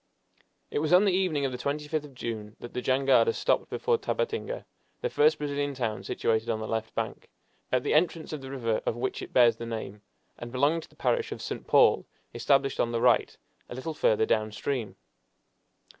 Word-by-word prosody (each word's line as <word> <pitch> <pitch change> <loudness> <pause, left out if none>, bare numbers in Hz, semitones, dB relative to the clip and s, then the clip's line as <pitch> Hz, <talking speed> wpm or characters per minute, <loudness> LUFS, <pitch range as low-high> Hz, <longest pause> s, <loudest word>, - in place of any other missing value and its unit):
It - - 0
was 155 +3 +1
on 185 +3 +7
the 200 - +4
evening 180 -7 +1
of 135 - -1
the 125 - -6
25th 150 +2 -2
of 140 -3 -14
June 110 -3 -5
that 120 - -9
the 125 - -2
jangada 135 - +3
stopped - - +1
before 470 -1 0
Tabatinga, 485 +1 -2 0.4
the 485 - -2
first 455 +1 +4
Brazilian 145 -1 -2
town 115 -4 -2
situated 115 +1 0
on 110 -1 0
the 110 - -4
left 110 0 -3
bank, - - -4 0.4
at 130 -1 +2
the - - 0
entrance 160 0 +1
of 150 - -5
the 135 - -8
river 115 -5 -1
of - - +1
which 125 +2 -3
it - - -8
bears 120 -2 +5
the 115 - -6
name, 110 -3 -6 0.4
and 120 0 -7
belonging 145 +6 +2
to - - -14
the - - -23
parish 465 -2 0
of - - -5
St. - - -6
Paul, - - +5 0.3
established 135 -1 +2
on 120 - +1
the 115 - 0
right - - +3 0.3
a - - -6
little 145 +5 -4
further 110 -7 +2
down 110 -1 +1
stream. 115 0 -3
135 Hz, 205 wpm, -28 LUFS, 115-155 Hz, 0.4 s, on